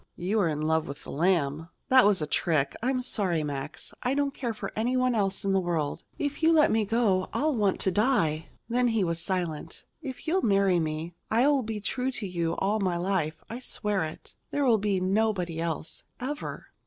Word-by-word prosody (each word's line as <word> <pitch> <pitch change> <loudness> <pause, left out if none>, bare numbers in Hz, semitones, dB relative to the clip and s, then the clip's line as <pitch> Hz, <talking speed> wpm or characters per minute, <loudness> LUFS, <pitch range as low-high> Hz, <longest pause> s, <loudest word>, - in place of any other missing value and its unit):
"You 195 +5 0
are 190 - +3
in 150 0 -2
love 160 0 +1
with 140 +1 -7
the - - -8
Lamb!" 160 -1 +1 0.2
"That 260 -4 +7
was 195 -6 +3
a - - 0
trick. 150 -2 0
I'm 255 +1 0
sorry, 185 -10 0
Max. 145 0 -5
I 255 +2 0
don't 285 -1 0
care 245 -5 -3
for 215 - -5
anyone 255 +3 +1
else 200 -2 0
in 195 - +2
the 195 - +4
world. 170 -5 -2
If 290 0 -3
you 325 0 +5
let 305 -2 +5
me 220 -1 +2
go 205 -4 +1
I'll 300 -1 +1
want 205 -4 +1
to 190 - +2
die." 175 - +1 0.2
Then, 245 +1 +2
as 235 - +1
he 210 - +3
was 170 -2 0
silent: 170 -4 -3 0.2
"If 270 +1 -7
you'll 370 +4 +2
marry 195 - +3
me, 160 +1 -3 0.2
I'll 265 +5 +4
be 220 -2 -4
true 250 +5 -2
to 210 - -3
you 170 -2 -1
all 205 +3 0
my 185 -4 0
life. 170 -4 -1
I 235 - -6
swear 210 -6 -1
it. 155 0 -7 0.2
There 285 -1 0
will 230 -4 +4
be 200 -2 +1
nobody 185 -3 0
else, 165 -1 -3 0.2
ever." 290 +4 -5
195 Hz, 205 wpm, -28 LUFS, 165-240 Hz, 0.2 s, That